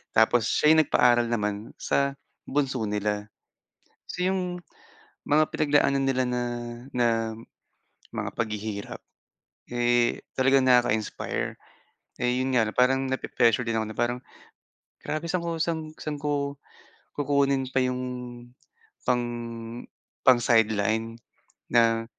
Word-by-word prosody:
tapos 110 Hz, +1 st, +4 dB
siya 150 Hz, -, +4 dB
yung 160 Hz, -, +6 dB
nagpaaral 120 Hz, -1 st, +4 dB
naman 105 Hz, -2 st, -3 dB
sa 140 Hz, 0 st, 0 dB, 0.3 s
bunso 135 Hz, -2 st, 0 dB
nila. 105 Hz, 0 st, -2 dB, 0.8 s
So, 180 Hz, -, -3 dB
yung 180 Hz, -1 st, -1 dB, 0.7 s
mga 155 Hz, +1 st, +3 dB
pinagdaanan 145 Hz, -2 st, +2 dB
nila 130 Hz, -1 st, +1 dB
na 125 Hz, 0 st, -1 dB, 0.5 s
na 120 Hz, -1 st, +2 dB, 1.0 s
mga -, -, -4 dB
paghihirap, 105 Hz, -2 st, -4 dB, 0.7 s
eh, 120 Hz, 0 st, +2 dB, 0.2 s
talagang 135 Hz, 0 st, +4 dB
nakaka-inspire, 120 Hz, -4 st, +1 dB, 0.7 s
eh, 125 Hz, 0 st, +2 dB
yun 130 Hz, -, -1 dB
nga 115 Hz, -3 st, +3 dB
parang 130 Hz, +1 st, +3 dB
nape-pressure 120 Hz, -2 st, +1 dB
din 115 Hz, -1 st, 0 dB
ako 110 Hz, -, -1 dB
na 110 Hz, -, -9 dB
parang 120 Hz, +1 st, 0 dB, 0.8 s
grabe, 155 Hz, +2 st, -3 dB
saan 175 Hz, +1 st, -1 dB
ko 170 Hz, -, -2 dB
saan 155 Hz, -2 st, -3 dB
ko 145 Hz, -1 st, -1 dB, 0.6 s
kukunin 140 Hz, -2 st, +1 dB
pa 130 Hz, 0 st, +1 dB
yung 125 Hz, 0 st, -1 dB, 1.0 s
pang 125 Hz, -1 st, +2 dB, 1.0 s
pang 125 Hz, -2 st, +6 dB
sideline? 115 Hz, 0 st, +1 dB, 0.5 s
Na 115 Hz, -1 st, +4 dB
125 Hz, 110 wpm, -26 LUFS, 115-140 Hz, 1.0 s, yung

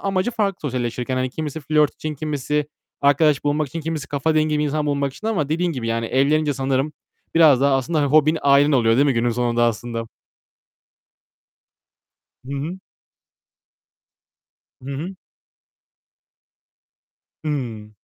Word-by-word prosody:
amacı 195 Hz, +3 st, 0 dB
farklı 205 Hz, -5 st, -1 dB
sosyalleşirken. 125 Hz, -1 st, -2 dB
Hani 130 Hz, 0 st, -1 dB
kimisi 155 Hz, +2 st, -5 dB
flört 150 Hz, 0 st, +2 dB
için, 155 Hz, -1 st, -5 dB
kimisi 150 Hz, 0 st, -2 dB, 0.3 s
arkadaş 145 Hz, +1 st, +3 dB
bulmak 145 Hz, 0 st, 0 dB
için, 165 Hz, +5 st, -5 dB
kimisi 155 Hz, -2 st, -4 dB
kafa 145 Hz, +3 st, 0 dB
dengi 155 Hz, -1 st, +2 dB
bir 150 Hz, -, +1 dB
insan 150 Hz, +1 st, -1 dB
bulmak 140 Hz, -2 st, 0 dB
için 215 Hz, -, -8 dB
ama 165 Hz, -11 st, 0 dB
dediğin 170 Hz, +2 st, 0 dB
gibi 125 Hz, -6 st, -4 dB
yani, 115 Hz, 0 st, -1 dB
evlenince 145 Hz, +3 st, +2 dB
sanırım 135 Hz, +2 st, -1 dB, 0.4 s
biraz 155 Hz, -6 st, +6 dB
daha 140 Hz, 0 st, +3 dB
aslında, 145 Hz, +5 st, -1 dB
hani, 145 Hz, -, +2 dB
hobin, 155 Hz, +2 st, +4 dB
ailen 140 Hz, +1 st, +5 dB
oluyor, 115 Hz, -4 st, +4 dB
değil 140 Hz, +3 st, +4 dB
mi 135 Hz, -, +3 dB
günün 120 Hz, +1 st, +1 dB
sonunda 120 Hz, 0 st, +1 dB
aslında? 115 Hz, 0 st, -2 dB, 2.4 s
Hı 135 Hz, -, -6 dB
hı. 155 Hz, +7 st, -4 dB, 2.0 s
Hı 135 Hz, -, -7 dB
hı. 180 Hz, +7 st, -6 dB, 2.3 s
Hıı. 120 Hz, -8 st, -4 dB
145 Hz, 135 wpm, -21 LUFS, 130-155 Hz, 2.4 s, biraz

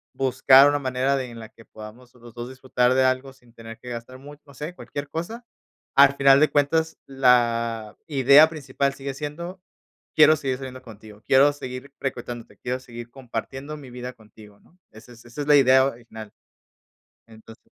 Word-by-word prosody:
buscar 135 Hz, +1 st, +5 dB
una 145 Hz, -, 0 dB
manera 130 Hz, 0 st, -1 dB
de 130 Hz, -2 st, -5 dB
en 115 Hz, -, -11 dB
la 110 Hz, -1 st, -10 dB
que 115 Hz, -, -19 dB
podamos 115 Hz, +4 st, -13 dB
los 120 Hz, -2 st, -15 dB
2 120 Hz, 0 st, -6 dB
disfrutar 130 Hz, -1 st, 0 dB
de 130 Hz, 0 st, +3 dB
algo 130 Hz, +1 st, -1 dB
sin 125 Hz, -3 st, -25 dB
tener 115 Hz, -1 st, -12 dB
que 125 Hz, -, -11 dB
gastar 120 Hz, +2 st, -8 dB
mucho". 145 Hz, +1 st, -14 dB
No 140 Hz, -, -17 dB
sé, 150 Hz, +6 st, -7 dB
cualquier 145 Hz, -4 st, -8 dB
cosa. 225 Hz, +9 st, -6 dB, 0.5 s
Al 140 Hz, 0 st, +6 dB
final 135 Hz, 0 st, +5 dB
de 155 Hz, -, +4 dB
cuentas, 160 Hz, +3 st, 0 dB
la 115 Hz, -4 st, +1 dB
idea 140 Hz, +1 st, +6 dB
principal 140 Hz, -3 st, -3 dB
sigue 140 Hz, 0 st, -6 dB
siendo, 170 Hz, +6 st, -7 dB, 0.5 s
quiero 155 Hz, 0 st, +6 dB
seguir 130 Hz, -3 st, -3 dB
saliendo 130 Hz, -1 st, -9 dB
contigo, 110 Hz, -2 st, -14 dB
quiero 135 Hz, +2 st, +5 dB
seguir 130 Hz, 0 st, -9 dB
frecuentándote, 120 Hz, -3 st, -6 dB
quiero 125 Hz, +1 st, -4 dB
seguir 120 Hz, -2 st, -11 dB
compartiendo 135 Hz, +3 st, -7 dB
mi 140 Hz, -3 st, -12 dB
vida 125 Hz, +1 st, -7 dB
contigo, 105 Hz, -2 st, -18 dB
¿no? 180 Hz, -, -28 dB
Esa 110 Hz, +3 st, -15 dB
es 120 Hz, 0 st, -18 dB
esa 120 Hz, +4 st, -8 dB
es 145 Hz, -, -5 dB
la 150 Hz, -, +6 dB
idea 130 Hz, 0 st, +5 dB
original. 115 Hz, -4 st, -8 dB, 0.9 s
Entonces 110 Hz, 0 st, -16 dB
130 Hz, 180 wpm, -23 LUFS, 120-140 Hz, 0.9 s, Al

